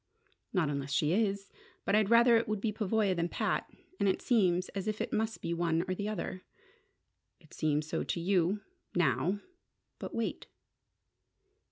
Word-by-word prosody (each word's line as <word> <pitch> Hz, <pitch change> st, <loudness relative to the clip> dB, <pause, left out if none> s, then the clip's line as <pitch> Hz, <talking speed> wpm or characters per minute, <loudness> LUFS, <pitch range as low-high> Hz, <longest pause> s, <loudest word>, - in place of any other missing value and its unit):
"Not 180 Hz, -6 st, +2 dB
unless 140 Hz, -1 st, -3 dB
she 150 Hz, +2 st, +2 dB
is. 200 Hz, -1 st, 0 dB, 0.3 s
But -, -, +1 dB
I'd 210 Hz, -1 st, +4 dB
rather 235 Hz, +1 st, +7 dB
it 230 Hz, -, +2 dB
would 215 Hz, -1 st, -1 dB
be 215 Hz, +1 st, 0 dB
Pavoya 210 Hz, -2 st, +1 dB
than 170 Hz, 0 st, 0 dB
Pat. -, -, -1 dB, 0.3 s
And 200 Hz, -, +3 dB
it 190 Hz, -, +1 dB
seems 185 Hz, -6 st, +2 dB
as 195 Hz, 0 st, -4 dB
if 215 Hz, 0 st, -1 dB
it -, -, -3 dB
must 220 Hz, +1 st, -1 dB
be 170 Hz, -, -1 dB
one 170 Hz, -1 st, +1 dB
or 185 Hz, -, 0 dB
the 205 Hz, +3 st, -3 dB
other." 185 Hz, -2 st, -4 dB, 1.0 s
"It 155 Hz, -3 st, -20 dB
seems 150 Hz, -1 st, 0 dB
so 155 Hz, -, -2 dB
to -, -, -2 dB
you 185 Hz, +2 st, +1 dB, 0.3 s
now. 165 Hz, -, +2 dB, 0.6 s
But -, -, -6 dB
wait." 230 Hz, -, -2 dB
190 Hz, 170 wpm, -32 LUFS, 170-215 Hz, 1.0 s, rather